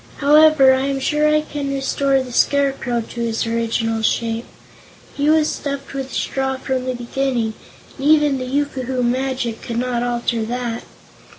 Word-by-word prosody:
However, 300 Hz, -2 st, +6 dB
I 265 Hz, +1 st, 0 dB
am 275 Hz, -1 st, -1 dB
sure 300 Hz, +3 st, +1 dB
I 305 Hz, 0 st, +3 dB
can 285 Hz, -2 st, -4 dB
restore 275 Hz, 0 st, +1 dB
the 250 Hz, -, -9 dB
Scarecrow 270 Hz, -2 st, +1 dB
to 235 Hz, +1 st, -7 dB
his 230 Hz, -1 st, -1 dB
original 225 Hz, -1 st, -1 dB
shape. 230 Hz, +1 st, -1 dB, 0.7 s
He 290 Hz, +1 st, 0 dB
was 310 Hz, -1 st, +4 dB
stuffed 280 Hz, -2 st, -4 dB
with 270 Hz, -1 st, -5 dB
straw 265 Hz, -1 st, -1 dB
from 260 Hz, -1 st, -2 dB
the 255 Hz, -1 st, -2 dB
beginning, 240 Hz, -2 st, -1 dB, 0.5 s
and 275 Hz, -, -1 dB
even 295 Hz, -3 st, +4 dB
the 255 Hz, -, -4 dB
yookoohoo 260 Hz, -2 st, -1 dB
magic 255 Hz, -1 st, -1 dB
could 235 Hz, -, -5 dB
not 245 Hz, -1 st, -1 dB
alter 240 Hz, -1 st, -1 dB
that. 240 Hz, 0 st, -4 dB
260 Hz, 160 wpm, -20 LUFS, 240-280 Hz, 0.7 s, However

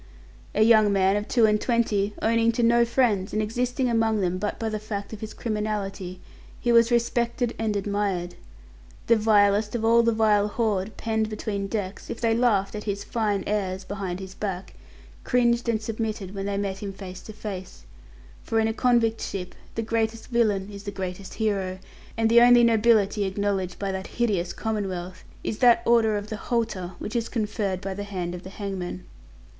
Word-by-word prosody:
A 215 Hz, -, +5 dB
young 220 Hz, -2 st, +6 dB
man 195 Hz, 0 st, +3 dB
of 205 Hz, 0 st, -2 dB
two 235 Hz, -3 st, +4 dB
and 210 Hz, -1 st, +2 dB
twenty 210 Hz, -4 st, +1 dB
owning 230 Hz, 0 st, +3 dB
to 240 Hz, +1 st, 0 dB
no 235 Hz, +1 st, +5 dB
friends, 230 Hz, -6 st, +1 dB
and 215 Hz, -, 0 dB
existing 245 Hz, +4 st, -1 dB
among 225 Hz, -2 st, +2 dB
them 185 Hz, -1 st, 0 dB
but 205 Hz, +1 st, -2 dB
by 225 Hz, -, -3 dB
the 215 Hz, -1 st, -2 dB
fact 205 Hz, -1 st, -5 dB
of 215 Hz, -, -7 dB
his 220 Hz, -1 st, -5 dB
criminality, 205 Hz, -4 st, -3 dB, 0.4 s
he 240 Hz, -, +1 dB
was 230 Hz, 0 st, +6 dB
respected 235 Hz, 0 st, 0 dB
and 220 Hz, -2 st, 0 dB
admired. 200 Hz, -3 st, -1 dB, 0.7 s
The 230 Hz, -, +5 dB
vilest 210 Hz, 0 st, +3 dB
of 225 Hz, -1 st, -1 dB
all 230 Hz, +1 st, +6 dB
the 230 Hz, 0 st, +3 dB
vile 215 Hz, -2 st, +3 dB
horde 210 Hz, -2 st, -1 dB
penned 220 Hz, -1 st, -1 dB
between 210 Hz, -2 st, -3 dB
decks, 200 Hz, -2 st, -4 dB
if -, -, -5 dB
they 230 Hz, -1 st, +2 dB
laughed 220 Hz, -5 st, +2 dB
at 210 Hz, 0 st, -6 dB
his 200 Hz, -1 st, -2 dB
"fine 210 Hz, -4 st, -1 dB
airs" 195 Hz, -2 st, -2 dB
behind 190 Hz, -2 st, -4 dB
his 190 Hz, -1 st, -8 dB
back, 190 Hz, -3 st, -5 dB, 0.5 s
cringed 240 Hz, -1 st, +2 dB
and 225 Hz, -2 st, +1 dB
submitted 215 Hz, -3 st, -4 dB
when 195 Hz, 0 st, -4 dB
they 200 Hz, 0 st, -1 dB
met 195 Hz, -1 st, -2 dB
him 200 Hz, -1 st, -5 dB
face 185 Hz, -2 st, -9 dB
to 215 Hz, -, -10 dB
face 195 Hz, -3 st, -7 dB, 0.6 s
for 225 Hz, -, 0 dB
in 220 Hz, -, +2 dB
a 225 Hz, -, -1 dB
convict 235 Hz, -2 st, +2 dB
ship 180 Hz, -2 st, -5 dB, 0.2 s
the 225 Hz, -, -1 dB
greatest 225 Hz, 0 st, -2 dB
villain 210 Hz, -5 st, +1 dB
is 200 Hz, -1 st, -8 dB
the 205 Hz, -, -6 dB
greatest 190 Hz, -1 st, -6 dB
hero, 195 Hz, -4 st, -1 dB, 0.4 s
and 225 Hz, 0 st, +3 dB
the 235 Hz, +1 st, +6 dB
only 240 Hz, 0 st, +7 dB
nobility 220 Hz, -3 st, +3 dB
acknowledged 190 Hz, -2 st, -1 dB
by 195 Hz, -1 st, -2 dB
that 190 Hz, 0 st, -4 dB
hideous 200 Hz, -8 st, 0 dB
commonwealth 185 Hz, -5 st, -4 dB, 0.2 s
is 215 Hz, -, -3 dB
that 240 Hz, -2 st, +5 dB
Order 225 Hz, -2 st, +4 dB
of 205 Hz, +1 st, -6 dB
the 215 Hz, -, -4 dB
Halter 215 Hz, -7 st, -2 dB
which 215 Hz, -, -6 dB
is 235 Hz, -1 st, -1 dB
conferred 210 Hz, -4 st, -2 dB
by 195 Hz, -1 st, -4 dB
the 205 Hz, +2 st, -5 dB
hand 185 Hz, -4 st, -4 dB
of 180 Hz, -, -6 dB
the 190 Hz, -, -9 dB
hangman. 190 Hz, -, -5 dB
210 Hz, 190 wpm, -25 LUFS, 195-225 Hz, 0.7 s, only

